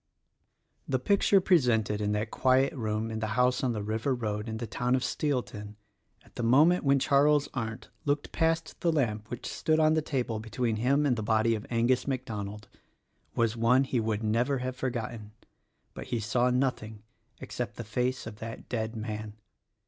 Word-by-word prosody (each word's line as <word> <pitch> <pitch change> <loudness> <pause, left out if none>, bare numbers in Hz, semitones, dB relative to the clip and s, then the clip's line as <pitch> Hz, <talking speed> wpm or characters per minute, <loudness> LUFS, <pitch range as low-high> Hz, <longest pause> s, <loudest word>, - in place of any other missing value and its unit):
The 130 - +1
picture 200 +7 +3
presented 120 - +2
in 105 0 0
that 105 +1 -2
quiet 130 +1 +3
roam 110 -3 -2
in 110 - -3
the 110 - -2
house 125 +1 +2
on 125 -2 +1
the 105 -2 -3
river 110 +5 -1
road 105 -2 -3
in 110 - -4
the 115 - -4
town 125 +2 0
of 130 - -1
Steelton, 120 -8 -2 0.5
at - - -22
the - - -2
moment 150 +10 +4
when 140 -1 +4
Charles 145 +1 +3
Arndt 115 -3 -5
looked 145 0 -1
past 165 0 0
the 170 - +2
lamp 110 -8 -1
which 120 - -6
stood 155 0 0
on 155 0 +4
the 160 - +2
table 125 -7 -2
between 110 +1 -2
him 140 +6 +2
and 125 -4 +2
the - - -2
body 110 +1 +2
of 110 -1 -4
Angus 120 +3 +1
Mac 130 -2 -2
Donald, 105 -2 -6 0.7
was 115 -1 +1
one 120 +3 +4
which 135 - -8
he 125 - +2
would 110 -1 -1
never 120 +6 +1
have 130 0 -3
forgotten; 120 -4 -4 0.6
but - - -8
he 120 - -1
saw 120 +3 +1
nothing 125 -5 -1 0.4
except - - -5
the 120 - -6
face 125 +4 -2
of 110 -1 -8
that 115 +1 -8
dead 110 -1 -2
man. 110 -1 -5
120 Hz, 185 wpm, -29 LUFS, 110-135 Hz, 0.7 s, moment